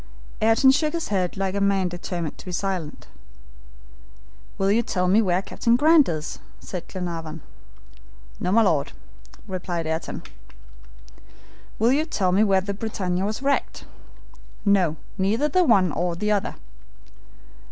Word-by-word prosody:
Ayrton 225 +5 +5
shook 300 +3 +1
his 335 -1 -3
head 185 -2 -1
like 190 -1 -1
a 200 - -1
man 195 -2 +2
determined 175 -2 -4
to - - -12
be - - -4
silent. 180 -4 -3 1.5
"Will 195 +1 +2
you 225 +3 +3
tell 185 -5 -1
me 200 +5 +5
where 185 -2 +1
Captain 235 +3 +1
Grant 305 - +5
is?" 155 -2 -4 0.2
asked 180 -3 -7
Glenarvan. 165 -4 -5 1.0
"No, 180 - -1
my 225 +3 +5
Lord," 155 -8 +1 0.5
replied 175 -3 -3
Ayrton. 160 +1 -4 1.5
"Will 230 +3 +3
you 290 +4 +2
tell 190 - 0
me 195 +4 +4
where 195 -3 +3
the 200 +1 -4
BRITANNIA 190 -4 -2
was 215 +6 -3
wrecked?" 280 0 -1 0.8
"No, 190 -6 +3 0.2
neither 215 +10 +2
the 365 +5 +3
one 200 - +4
nor 175 +2 -1
the 210 +4 -1
other." 205 -2 0
195 Hz, 140 wpm, -24 LUFS, 180-220 Hz, 1.5 s, Ayrton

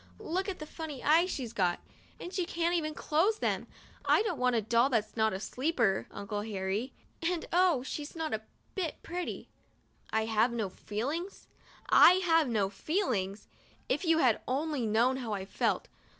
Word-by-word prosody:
Look 370 +5 -2
what 360 -6 -5
funny 310 -5 -7
eyes 330 +5 +4
she's 245 -9 -4
got! 180 -5 +1 0.4
And 355 - -7
she 370 - 0
can't 335 -3 0
close 365 +9 +2
them! - - -1 0.4
I - - +4
don't 450 - -2
want 250 -1 +2
a 225 - +2
doll 235 +4 +3
that's 220 -4 0
not 220 -1 +2
a 190 - -3
'sleeper,' 245 -4 0
Uncle 205 +1 -4
Harry, 205 +3 -2 0.3
and 335 0 -1
oh! 350 -7 +4
she's 290 +3 -6
not 320 -4 -3
a 220 - -1 0.3
bit 355 -6 -3
pretty." 355 +1 -5 0.6
1 220 0 +1
have 225 +2 +2
no 220 -5 -1
feelings? 280 - -4 0.5
I - - +9
have 330 -5 +3
no 210 -4 +1
feelings? 205 - -2 0.4
If - - 0
you 330 -2 +3
had 255 -8 +3
only 275 -2 -1
known 235 +5 +3
how 235 -5 -3
I 195 -2 -3
felt - - -1
260 Hz, 165 wpm, -31 LUFS, 220-330 Hz, 0.6 s, I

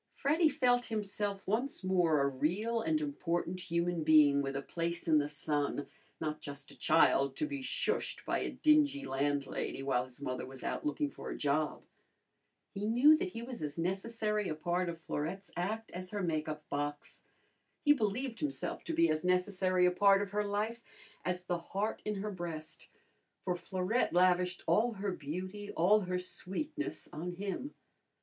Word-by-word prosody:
Freddy 315 +3 +3
felt 245 -3 +2
himself 205 -2 -3
once 230 +4 -1
more 175 -5 +3
a 140 - +3
real 195 - 0
and 310 +6 +1
important 185 - -2
human 170 -1 -1
being 150 -2 +6
with 135 -1 -3
a 140 - -1
place 170 +2 -3
in 155 -2 +5
the 145 - 0
sun, 145 -1 -1 0.3
not 155 -1 -3
just 140 -1 -7
a - - -13
child 135 0 +4
to - - 0
be 285 -2 -4
shushed 260 - -1
by - - 0
a - - -2
dingy 295 -2 +3
landlady 140 0 -1
while 130 -2 +1
his 130 0 -13
mother 130 -2 -3
was 130 0 -9
out - - -2
looking 300 0 0
for 285 - -8
a - - -4
job. 150 +1 0 0.9
He 200 -1 -4
knew 255 +8 +7
that 375 +3 -2
he 230 - -5
was 245 -4 -7
as 150 0 -3
necessary 210 +4 -1
a 155 - -2
part 175 +3 0
of 165 -1 -5
Florette's 165 +5 -4
act 215 +6 -2
as 185 +1 -6
her 205 -1 -3
make 155 -3 -1
up 150 0 -6
box. 145 0 -4 0.6
He 290 - +8
believed 230 0 -1
himself 295 -2 -3
to 330 - -2
be 335 +1 +5
as 155 - 0
necessary 180 0 +2
a 180 - +5
part 195 +2 +5
of 200 - -7
her 210 0 +1
life 210 +3 -2 0.4
as 180 0 -2
the 175 -1 -1
heart 200 +5 -2
in 210 - -2
her 205 +2 -3
breast, 165 -4 -6 0.6
for 180 -2 0
Florette 185 +6 0
lavished 180 0 +3
all 230 +2 +3
her 200 -1 -2
beauty, 185 +6 -5
all 195 +6 +4
her 180 -2 -2
sweetness 290 - -4
on 175 +4 -4
him. 200 +9 -4
185 Hz, 175 wpm, -33 LUFS, 155-220 Hz, 0.9 s, He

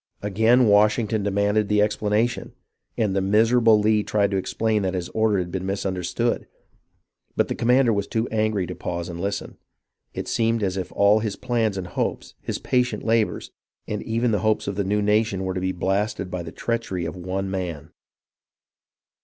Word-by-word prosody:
Again 110 +5 +4
Washington 105 +1 +3
demanded 100 +1 +1
the 105 0 +3
explanation, 105 +3 0 0.4
and 105 -4 0
the 95 - +2
miserable 110 +3 +4
Lee 105 0 +3
tried 105 -1 0
to 100 - +1
explain 110 +3 0
that 95 -1 -1
his 90 -1 -3
order 110 -2 +1
had 90 -2 -2
been 95 0 -3
mis 100 +1 -2
understood, 95 +5 -1 0.9
but - - +1
the - - 0
commander 125 0 +3
was 100 -1 -1
too 115 0 -1
angry 110 -3 0
to 90 - -6
pause 85 0 -4
and 85 0 -6
listen. 100 +1 -4 0.6
It - - -4
seemed 115 -1 +1
as 95 -2 0
if 95 -1 -4
all 100 +2 +4
his 110 -2 -3
plans 115 -5 -1
and 95 - -4
hopes, 90 - -3
his - - -3
patient 125 -1 0
labours, 115 -1 0 0.4
and 105 -1 -3
even 115 +1 0
the 105 - +1
hopes 110 +2 0
of 100 - -2
the 100 - 0
new 105 +2 0
nation 105 -2 +1
were 95 0 -2
to 90 - -3
be 95 0 0
blasted 95 +1 -1
by 90 - -3
the 80 -1 -7
treachery 115 -7 -3
of 80 - -5
one 95 +2 -3
man. 90 -6 -4
105 Hz, 185 wpm, -23 LUFS, 95-110 Hz, 0.9 s, Again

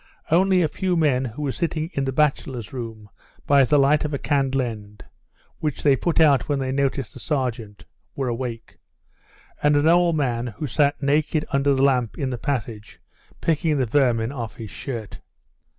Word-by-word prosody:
Only 185 +1 +4
a - - +2
few 180 +3 -1
men 135 -5 +2
who 125 +5 -6
were 140 - -1
sitting 165 +1 -3
in 140 - -1
the 135 - -1
bachelors' 135 -5 -1
room 115 -4 -7 0.4
by 140 -1 +5
the 145 +3 +3
light 145 +2 +4
of 150 -1 -2
a - - -1
candle 135 -2 0
end, 105 -3 -8 0.5
which 150 -3 -3
they 140 -2 +5
put 165 +6 0
out 150 -4 +4
when 145 - +1
they 130 -1 -2
noticed 135 -3 -1
the - - -11
sergeant, 120 -8 -3 0.3
were 135 -2 -2
awake, 120 -1 -5 0.8
and 145 0 +3
an 145 +2 +3
old 170 0 +4
man 120 -4 -1
who 120 +6 -6
sat 145 +2 +1
naked 150 +2 +1
under 140 0 +2
the 135 - +1
lamp 125 -5 +1
in 135 -3 -2
the 125 - -4
passage 115 -5 -4 0.4
picking 160 -1 +1
the 130 - +1
vermin 120 -2 +1
off 120 -5 -6
his 110 -4 -8
shirt. 115 -4 -6
135 Hz, 180 wpm, -23 LUFS, 120-150 Hz, 0.8 s, by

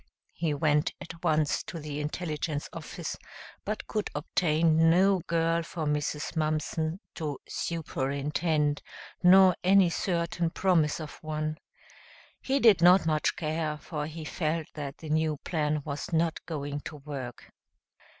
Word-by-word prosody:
He 160 -3 -1
went 150 +1 +2
at 165 0 -10
once 155 -1 +2
to - - -6
the 150 -2 -5
intelligence 150 -1 -3
office, - - -5 0.5
but 215 +1 -3
could 215 -1 -2
obtain 160 +1 +3
no 190 +3 +4
girl 165 0 +2
for 165 -1 -5
Mrs. 150 +1 -1
Mumpson 155 +2 -1
to 150 -4 -4
"superintend," 150 -1 -1 0.4
nor 185 0 +7
any 190 -1 +5
certain 170 -1 -1
promise 165 -4 +2
of 155 -2 -8
one. 155 0 -3 0.8
He 270 +1 +1
did 220 -8 +6
not 180 +2 +7
much 155 -1 +1
care, 155 -1 -2
for 150 -1 -5
he 160 0 -7
felt 155 0 -1
that 140 -2 -6
the 160 - -9
new 155 0 +1
plan 150 -3 0
was 145 -1 -4
not 165 0 +1
going 145 -3 -3
to 155 - -6
work. 140 -4 -7
155 Hz, 135 wpm, -29 LUFS, 150-170 Hz, 0.8 s, nor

